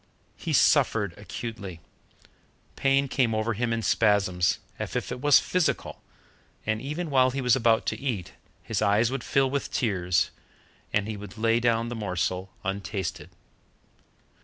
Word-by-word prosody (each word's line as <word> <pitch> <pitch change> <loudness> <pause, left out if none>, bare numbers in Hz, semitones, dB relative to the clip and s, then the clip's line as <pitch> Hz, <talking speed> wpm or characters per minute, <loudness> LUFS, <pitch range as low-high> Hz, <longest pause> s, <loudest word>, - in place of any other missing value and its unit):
He - - -5
suffered 100 -5 +3
acutely. 105 -4 -7 1.0
Pain 135 0 +2
came 125 -4 +1
over 110 +2 0
him 115 +2 -1
in 115 -1 -1
spasms, 95 -6 +2 0.2
as - - -4
if - - -2
it 125 0 -5
was 145 -1 +7
physical, 180 -2 -1 0.6
and 110 0 -1
even 150 +4 -4
while 130 -1 +5
he 135 +2 -3
was 125 -2 +4
about 115 -3 +3
to - - -2
eat, 120 -10 -3 0.3
his 110 - -2
eyes 110 +4 +3
would 135 -3 -3
fill 135 -1 +2
with 140 0 -2
tears, 90 -6 +1 0.6
and 105 0 +1
he 110 -1 -4
would 100 +1 -10
lay 115 +1 +2
down 115 -1 +1
the 120 - -4
morsel 95 -2 -2
untasted. 95 -2 -4
115 Hz, 150 wpm, -27 LUFS, 100-130 Hz, 1.0 s, was